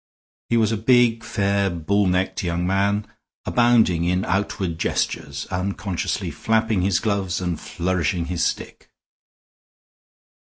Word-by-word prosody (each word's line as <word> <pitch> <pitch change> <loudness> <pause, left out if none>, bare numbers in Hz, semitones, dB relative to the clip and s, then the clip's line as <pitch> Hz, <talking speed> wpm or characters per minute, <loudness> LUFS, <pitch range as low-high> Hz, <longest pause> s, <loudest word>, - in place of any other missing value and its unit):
He 120 - +2
was 110 -1 +2
a 110 - 0
big, 115 0 +3
fair, 100 0 0
bull 95 +4 0
necked 90 +1 0
young 85 0 -1
man, 100 +2 +1 0.4
abounding 115 -8 +3
in 90 +2 0
outward 95 -3 -2
gestures, 70 -3 -2
unconsciously 95 0 -2
flapping 110 -3 +1
his 95 -1 +2
gloves 100 -4 -1
and 90 -3 -2
flourishing 85 -1 -1
his 85 0 -2
stick. - - -4
95 Hz, 120 wpm, -22 LUFS, 90-105 Hz, 0.4 s, big